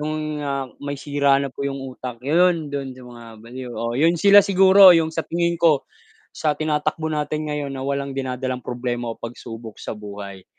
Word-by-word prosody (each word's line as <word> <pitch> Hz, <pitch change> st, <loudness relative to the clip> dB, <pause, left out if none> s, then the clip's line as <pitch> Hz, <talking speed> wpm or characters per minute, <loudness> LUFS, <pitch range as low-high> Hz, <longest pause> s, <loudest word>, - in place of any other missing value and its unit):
yung, 155 Hz, 0 st, -3 dB
ah, 140 Hz, -1 st, -2 dB
may 145 Hz, 0 st, -4 dB
sira 140 Hz, -1 st, +2 dB
na 140 Hz, -, -3 dB
po 140 Hz, -, -5 dB
yung 140 Hz, 0 st, -4 dB, 0.2 s
utak, 125 Hz, -2 st, -7 dB
yun 165 Hz, +2 st, +2 dB
dun 135 Hz, -2 st, -4 dB
sa 130 Hz, -, -13 dB
mga 120 Hz, -1 st, -12 dB, 0.2 s
baliw. 125 Hz, +1 st, -8 dB
Oo, 115 Hz, 0 st, -3 dB
yun 165 Hz, +3 st, +4 dB
sila 200 Hz, +4 st, +7 dB
siguro 190 Hz, -1 st, +7 dB
yung 160 Hz, -1 st, +2 dB
sa 160 Hz, -, -3 dB
tingin 170 Hz, 0 st, 0 dB
ko 160 Hz, -5 st, +3 dB, 0.5 s
sa 155 Hz, -2 st, 0 dB
tinatakbo 155 Hz, +1 st, -1 dB
natin 150 Hz, 0 st, -2 dB
ngayon 145 Hz, -2 st, -3 dB
na 135 Hz, -1 st, -5 dB
walang 140 Hz, 0 st, -2 dB
dinadalang 130 Hz, -1 st, -3 dB
problema 120 Hz, -1 st, -3 dB
o -, -, -13 dB
pagsubok 115 Hz, -1 st, -8 dB
sa -, -, -5 dB
buhay, 100 Hz, -2 st, -9 dB
140 Hz, 185 wpm, -22 LUFS, 125-155 Hz, 0.5 s, sila